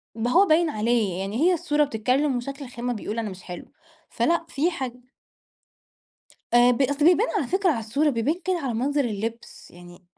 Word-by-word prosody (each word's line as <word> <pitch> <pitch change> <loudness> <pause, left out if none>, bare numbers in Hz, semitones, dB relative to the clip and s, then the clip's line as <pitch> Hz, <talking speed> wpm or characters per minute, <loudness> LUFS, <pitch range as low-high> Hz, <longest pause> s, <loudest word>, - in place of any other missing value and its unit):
ما 230 +2 -1
هو 375 +7 +6
باين 330 -1 +3
عليه، 215 - 0
يعني 195 +3 -3
هي 360 +3 +4
الصورة 300 -3 +1
بتتكلم 260 +2 0
وشكل 275 +3 -6
الخامة 245 0 -4
بيقول 215 0 -5
أنا 220 -2 -3
مش 185 -1 -11
حلو، 180 -1 -8 0.4
فلأ 330 +8 0
فيه 315 +3 0
حاج 260 -7 -4 1.6
آآ، 240 +1 +6
ب 245 - -1
أصل 285 +2 +1
بيبان 360 +7 +5
على 300 -10 -1
فكرة 380 +4 +1
على 270 - -2
الصورة 275 +8 0
بيبان 265 +4 0
كده 370 -1 +1
على 265 -6 -3
منظر 280 +4 0
اللبس، 225 +1 -6
يعني 175 +1 -15
250 Hz, 185 wpm, -24 LUFS, 225-300 Hz, 1.6 s, هو